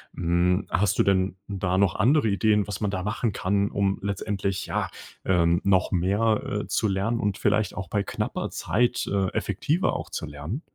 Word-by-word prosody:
Hm, 90 +2 +1
hast 105 +1 +1
du - - +6
denn 95 -1 +1
da 95 -2 -1
noch 100 -4 +3
andere 135 +2 +3
Ideen, 105 0 +2
was 105 +1 -5
man 100 -1 0
da 95 -2 -3
machen 105 +2 -1
kann, 100 +1 0
um 100 -1 0
letztendlich 100 -1 -2
ja, - - -2 0.3
ähm, 85 -2 +2
noch 95 -1 +2
mehr, 100 +5 +2 0.2
äh, - - -9
zu 110 - +1
lernen 100 +5 0
und 100 -1 0
vielleicht 105 -1 +1
auch 95 -3 -5
bei 100 +2 0
knapper - - -3
Zeit, 120 +2 0
äh, 100 -1 +1
effektiver 165 +5 0
auch - - -5
zu - - -4
lernen? 75 - -6
100 Hz, 185 wpm, -25 LUFS, 95-105 Hz, 0.3 s, du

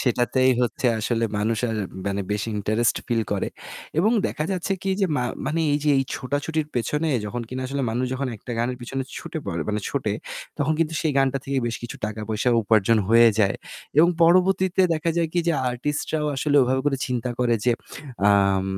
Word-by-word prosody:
সেটাতেই 125 +1 +2
হচ্ছে 120 +1 -1
আসলে 115 +1 0
মানুষ 110 +2 0
আর 110 - -2 0.3
মানে 100 0 -1
বেশি 105 +2 -2
ইন্টারেস্ট 110 +3 +1
ফিল 115 -2 +1
করে। 100 - -1 0.5
এবং 210 +6 +4 0.2
দেখা 150 - -3
যাচ্ছে 185 +1 -1
কি 195 - -1
যে 195 - +3
মা 125 - 0 0.2
মানে 165 +2 0
এই 145 - +2
যে 150 - +4
এই - - +3
ছোটাছুটির 145 +4 -2
পেছনে 150 +7 0 0.2
যখন 120 +3 -4
কিনা 130 +1 -4
আসলে 135 +1 -2
মানুষ 125 +3 -1
যখন 130 0 -2
একটা 120 - -8
গানের 125 +2 -1
পেছনে 135 +2 -3 0.2
ছুটে 160 - -6
পড়ে 85 -4 -2
মানে 105 0 0
ছোটে 125 -7 -1 0.5
তখন 150 +1 +1
কিন্তু 165 -1 0
সেই 155 -3 0
গানটা 135 0 +2
থেকে 135 0 -1
বেশ 120 - -2
কিছু 120 - -6
টাকা 110 0 -5
পয়সা 110 +3 0
উপার্জন 110 +1 +3
হয়ে 115 +1 +7
যায়। 100 -2 +2 0.4
এবং 170 - +7
পরবর্তীতে 185 +2 +4
দেখা 160 +1 -1
যায় 165 -1 +1
কি 175 - 0
যে - - +4 0.2
artist 145 +4 -2
রাও 150 -1 0
আসলে 145 +1 +1
ওভাবে 130 +1 +1
করে 140 -2 +2
চিন্তা 125 -1 -2
করে 120 -2 +2
যে 125 - +4 0.6
আম 100 -1 +3
125 Hz, 195 wpm, -24 LUFS, 115-150 Hz, 0.6 s, হয়ে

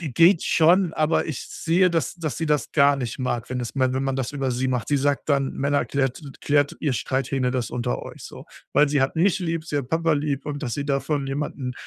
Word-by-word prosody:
geht 165 +3 +4
schon, 170 +2 +4
aber 155 +1 +1
ich 155 -6 -4
sehe, 180 +3 +2
dass 165 -2 -1
dass 165 -5 -4
sie 160 - -1
das 150 -1 0
gar 140 -1 +5
nicht 125 -4 -4
mag, 120 -3 -3
wenn 130 - -2
es 120 - -5
wenn 130 0 +1
man 135 -1 -1
das 130 -2 -2
über 135 -2 -1
sie 130 +2 -1
macht. 125 -2 -1
Sie 145 - +2
sagt 145 +2 0
dann: 140 -2 +1
„Männer, 140 +1 +1
klärt 135 +1 -1 0.2
klärt 145 -1 +1
ihr 145 - 0
Streithähne 130 0 -1
das 125 -2 -2
unter 125 0 -2
euch.“ - - -10
So, - - -10 0.3
weil 145 +1 +4
sie 140 -2 +2
hat 135 - -1
mich 190 +4 +2
lieb, 165 -2 -2
sie 150 -3 -2
hat 130 -3 -5
Papa 165 +1 +1
lieb 145 -1 -2
und 145 0 -4
dass 120 -4 -2
sie 145 - -3
davon 140 0 -1
jemanden, 135 -2 -3
145 Hz, 235 wpm, -24 LUFS, 130-155 Hz, 0.3 s, gar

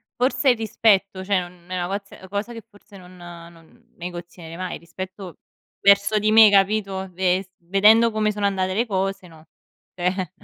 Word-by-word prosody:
forse 255 +2 +1
il 245 - +3
rispetto, 200 -3 +1
cioè 195 -2 +1
un 175 0 -12
è - - -6
una - - -3
coz 200 +1 -5
ehm, 190 - -13
cosa 205 +4 -4
che 230 - -9
forse 205 0 -18
non 180 0 -15
non 170 +6 -15
negozierei 175 -1 -9
mai 185 0 -5
rispetto 185 +2 -9 0.4
verso 200 +1 +4
di 215 +1 +1
me, 220 -1 +8
capito, 195 -1 +1
ves 185 +1 0
vedendo 210 +6 +4
come 215 0 0
sono 205 -1 -3
andate 190 -1 -1
le 235 +3 +1
cose, 195 -2 -3
no. 160 -2 -17 0.5
Cioè 180 0 -2
195 Hz, 170 wpm, -22 LUFS, 180-210 Hz, 0.5 s, me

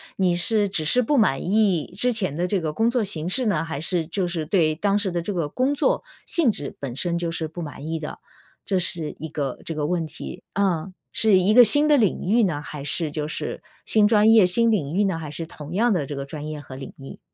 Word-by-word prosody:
你 185 -2 +1
是 205 +3 +2
只 160 -5 -1
是 250 +10 +3
不 275 +4 +1
满 135 - +2
意 190 -4 +1
之 245 +3 +2
前 185 -10 -1
的 180 +1 0
这 190 -2 -1
个 155 - -2
工 225 +9 +1
作 240 -2 0
形 170 -5 0
式 250 +8 +2
呢， 165 -6 0
还 155 -3 -5
是 170 -2 -1
就 180 +2 -2
是 165 -3 -3
对 155 -2 +1
当 200 +4 +1
时 195 -3 -1
的 175 - -2
这 200 +5 -4
个 165 -5 -2
工 260 - 0
作 - - 0 0.2
性 320 -8 +3
质 140 - -6
本 130 -4 -6
身 170 +4 0
就 170 -1 -2
是 160 -1 -3
不 175 +2 -8
满 150 -1 -8
意 160 0 -3
的？ 150 - -7 0.5
这 190 -2 0
是 170 -3 -1
一 160 - -5
个 140 -4 -4
这 165 - -5
个 150 -1 -2
问 170 0 -1
题。 155 +2 -9
嗯， 185 -2 -1 0.2
是 215 -4 +4
一 190 +4 +3
个 245 0 +8
新 290 +8 +6
的 295 - +5
领 210 -7 +1
域 230 +1 +4
呢， 155 -6 -1
还 150 -1 -8
是 155 0 +1
就 150 -1 -3
是 155 - -5 0.2
新 215 -1 +4
专 215 0 +4
业 220 -4 +6
新 230 +6 +3
领 160 -8 -1
域 205 - +2
呢， 190 -4 -1
还 155 -2 -7
是 165 +2 -5
同 155 0 -10
样 230 +4 +2
的 165 -8 0
这 145 - -6
个 140 0 -5
专 150 +1 -7
业 155 -1 -6
和 130 -1 -11
领 135 - -9
域？ 135 0 -11
175 Hz, 275 characters per minute, -23 LUFS, 155-210 Hz, 0.5 s, 个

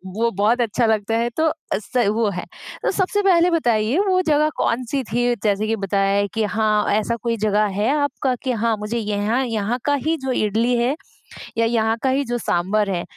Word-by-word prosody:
वो 230 +1 +1
बहुत 225 +4 +2
अच्छा 230 +1 +1
लगता 220 0 +1
है 235 +1 0
तो 320 0 +3 0.2
स 225 +3 -1
वो 215 0 +1
है। 180 - -5 0.4
तो - - +1
सबसे 390 +2 0
पहले 355 -2 +4
बताइए 240 -5 +1
वो 370 -1 +3
जगह 305 0 +3
कौन-सी 255 +3 -1
थी 245 +1 +1
जैसे 210 0 +1
कि 225 - +1
बताया 195 -1 0
है 200 0 +1
कि 225 -1 0
हाँ, 210 0 +1
ऐसा 215 +2 0
कोई 230 -1 0
जगह 210 0 +2
है 215 +4 +1
आपका 285 -2 0
कि 260 - 0
हाँ, 230 -1 0
मुझे 210 +3 -3
यहाँ 215 +3 0
यहाँ 225 +1 -2
का 290 - +2
ही 325 +1 +2
जो 260 - 0
इडली 230 +2 +1
है 245 +5 +1 0.6
या 230 - +3
यहाँ 225 -1 +1
का 265 - +1
ही 275 +2 +1
जो 240 0 -2
साँभर 200 +2 0
है 175 -2 -1
230 Hz, 205 wpm, -21 LUFS, 210-255 Hz, 0.6 s, पहले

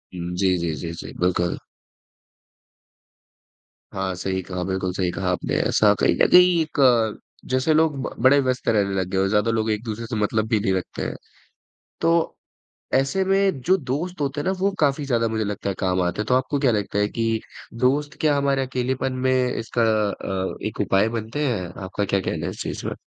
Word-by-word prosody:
उम, 90 0 -4
जी, 95 0 +2
जी, 85 -2 -2
जी, 85 +3 -5
जी, 85 - -8
बिल्कुल। 90 -1 0 2.3
हाँ, 95 -1 -2
सही 95 +1 -2
कहा, 90 0 -4
बिल्कुल 95 0 -2
सही 90 -1 -1
कहा 95 +1 -2
आपने 90 - -2
ऐसा - - +4
कहीं - - +3
न - - +4
कहीं 180 -1 +7
एक, 125 -8 +2 0.3
जैसे 130 +5 +2
लोग 155 -1 +3
ब - - -4
बड़े 135 +2 +6
व्यस्त 130 -2 -1
रहने 100 -3 +2
लग 95 - -1
गए 95 - -1
हों, 95 +1 +2
ज़्यादा 105 +3 +2
लोग 110 -1 0
एक 105 +1 -2
दूसरे 115 0 -5
से 110 - -4
मतलब 110 +1 0
भी 110 -2 +2
नहीं 100 -2 0
रखते 95 -1 -4
हैं। - - -4 0.9
तो 165 0 +2 0.6
ऐसे 135 +9 +2
में 195 -4 +2
जो 185 +8 +3
दोस्त 155 +4 -4
होते 145 +1 -1
हैं - - -7
ना, - - +3
वो 195 +2 +2
काफ़ी 145 -1 +1
ज़्यादा 120 -4 +1
मुझे 110 -1 -1
लगता 100 -1 -3
है 95 - -2
काम 90 0 +1
आते 90 +3 -1
है, - - -3
तो 125 - +1
आपको 130 +2 0
क्या 135 -3 +3
लगता 105 -1 -1
है 105 - +2
कि 115 0 -1 0.3
दोस्त 135 +5 0
क्या 150 -2 +3
हमारे 140 -1 +1
अकेलेपन 130 +1 -2
में 130 - +4 0.2
इसका 115 +1 -1 0.3
अ, 95 -1 -3
एक - - -8
उपाय 100 +3 +2
बनते 115 +7 -3
हैं? 105 -8 -1 0.2
आपका 100 +2 -2
क्या 100 0 +1
कहना 95 - -3
है - - -2
इस - - -8
चीज़ - - -5
में? - - -2
115 Hz, 205 wpm, -23 LUFS, 95-140 Hz, 2.3 s, कहीं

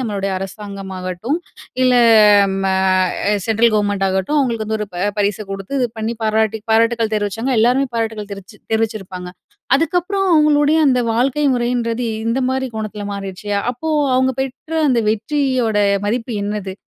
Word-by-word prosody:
நம்மளுடைய 200 -5 -2
அரசாங்கமாகட்டும், 195 - -5 0.5
இல்ல 255 0 +4 0.7
ம - - -2 0.7
அ - - +3
சென்ட்ரல் 225 +1 +3
கவர்மெண்ட்டாகட்டும், 200 +3 0
அவுங்களுக்கு 235 -5 0
வந்து 220 0 -2
ஒரு 210 - -2
ப 175 +2 -1
பரிச 205 -1 +1
கொடுத்து 195 +7 -5
இது 245 - +1
பண்ணி 220 +2 -2
பாராட்டி 220 0 +1
பாராட்டுகள் 230 0 +2
தெரிவிச்சாங்க. 215 +5 -1
எல்லாருமே 250 +5 +3
பாராட்டுக்கள் 220 -2 -3
தெரிவிச்சு 200 +2 -11
தெரிவிச்சுருப்பாங்க. 205 -5 -2 0.5
அதுக்கப்புறம் 360 +5 0
அவுங்களுடைய 300 0 +4
அந்த 250 -2 +2
வாழ்க்கை 270 +5 +1
முறையின்றது 240 0 -1 0.2
இந்தமாரி 260 +2 0
கோணத்துல 215 -1 -5
மாறிருச்சு. 195 0 -6 0.2
அப்போ 285 +6 -6 0.3
அவுங்க 260 0 +2
பெற்ற 270 +4 -7 0.2
அந்த 240 - +2
வெற்றியோட 245 -1 0 0.3
மதிப்பு 235 +2 -2
என்னது? 205 -2 -4
225 Hz, 130 wpm, -18 LUFS, 205-255 Hz, 0.7 s, இல்ல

